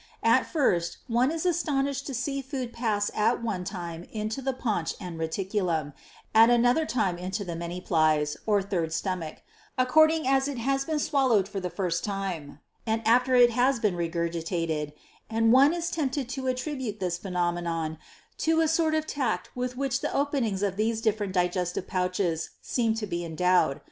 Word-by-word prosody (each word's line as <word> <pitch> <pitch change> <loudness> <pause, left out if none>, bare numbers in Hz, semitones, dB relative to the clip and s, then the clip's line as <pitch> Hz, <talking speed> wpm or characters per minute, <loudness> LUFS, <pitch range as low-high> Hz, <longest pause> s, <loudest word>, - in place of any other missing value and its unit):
7. - - +5
At - - +2
first, 175 - +1
one 245 +2 +2
is 325 +2 -3
astonished 280 -5 0
to 275 - -4
see 275 +3 -2
food 260 -3 -5
pass 215 -3 0
at 230 +3 +1
one 200 -6 -2
time 175 -3 -6
into 215 +4 -3
the 270 +1 0
paunch 220 -10 -2
and 175 -2 -7
reticulum, 165 -3 -1 0.4
at 225 +1 +7
another 245 +6 +3 0.3
into 190 +3 -3
the 170 -2 -4
many 170 +2 -5
piles, 155 -4 +2
(third 195 -6 +1
stomach,) 175 -3 -3 0.3
according 315 +4 +4
as 270 0 +3
it 285 -3 -4
has 270 +3 0
been 315 0 -1
swallowed 260 - +2
for 200 - -4
the 180 -1 -3
first 175 -1 -2
time, 190 -9 -4 0.3
or 220 0 +1
after 250 +3 +4
it 245 -1 +7
has 255 +3 +2
been 210 -6 0
regurgitated, 165 -2 -2 0.4
and 225 0 +3
one 275 +3 +7
is 340 0 -2
tempted 280 -4 -1
to 265 0 -4
attribute 255 -4 -3
this 180 -2 -2
phenomenon 175 -3 -2 0.4
to 325 0 +2
a 325 - +3
sort 320 0 +2
of 310 0 0
tact 235 -12 -2
with 250 0 -3
which 270 -1 -1
the - - -2
openings 260 -9 0
of 195 -1 -1
these 220 +1 0
different 215 -3 0
digestive 180 0 0
pouches 180 -3 -1
seem 230 -3 0
to 225 -1 -3
be 175 -3 -3
endowed. 170 -3 +2
215 Hz, 170 wpm, -27 LUFS, 175-260 Hz, 0.4 s, at